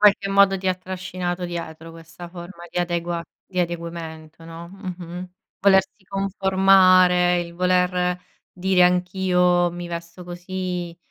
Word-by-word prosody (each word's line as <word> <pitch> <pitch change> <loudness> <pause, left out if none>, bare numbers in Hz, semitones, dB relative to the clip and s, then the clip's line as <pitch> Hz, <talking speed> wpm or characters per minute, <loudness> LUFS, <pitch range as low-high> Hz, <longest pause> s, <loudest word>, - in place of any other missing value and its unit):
qualche 205 -1 +4
modo 195 -1 +4
ti 190 - -6
ha 185 - +3
trascinato 180 -1 -5
dietro 165 -2 -6
questa 165 +1 -11
forma 175 0 -10
di - - -3
adegua 170 -1 -2 0.2
di 185 -1 -2
adeguamento, 165 -2 -6
no, 165 +1 -9
mh-mh, 180 -2 -8 0.3
volersi 190 +1 +3
conformare, 190 -2 +4
il 170 0 -7
voler 180 0 +1 0.3
dire: 185 0 +2
"Anch'io 180 -1 +2
mi 175 0 -7
vesto 170 +1 -7
così." 180 -1 -5
180 Hz, 125 wpm, -22 LUFS, 170-185 Hz, 0.3 s, qualche